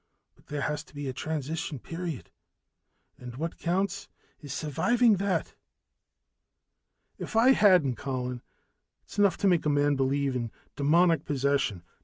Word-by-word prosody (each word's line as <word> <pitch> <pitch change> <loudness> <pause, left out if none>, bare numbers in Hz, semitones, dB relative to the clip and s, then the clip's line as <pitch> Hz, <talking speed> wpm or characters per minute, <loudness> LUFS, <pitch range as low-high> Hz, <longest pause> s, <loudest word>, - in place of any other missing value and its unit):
But - - -27
there 145 -1 -4
has 145 +1 -2
to - - -21
be 145 -1 -5
a 130 - -3
transition 155 +3 -4
period, 165 +2 -6 0.9
and 125 -1 -9
what 160 +5 -4
counts 190 +3 -1 0.3
is 145 -3 -9
surviving 220 - +2
that." 195 0 -1 1.7
"If - - -6
I 235 +4 +6
hadn't 180 - +4
Colin, 125 -2 -4 0.6
it's - - -9
enough 200 -4 +4
to 200 - +1
make 175 -4 +2
a - - +3
man 145 0 +2
believe 135 0 0
in 120 -2 -2 0.3
demoniac 165 +4 +3
possession." 140 -9 0
150 Hz, 140 wpm, -28 LUFS, 135-180 Hz, 1.7 s, I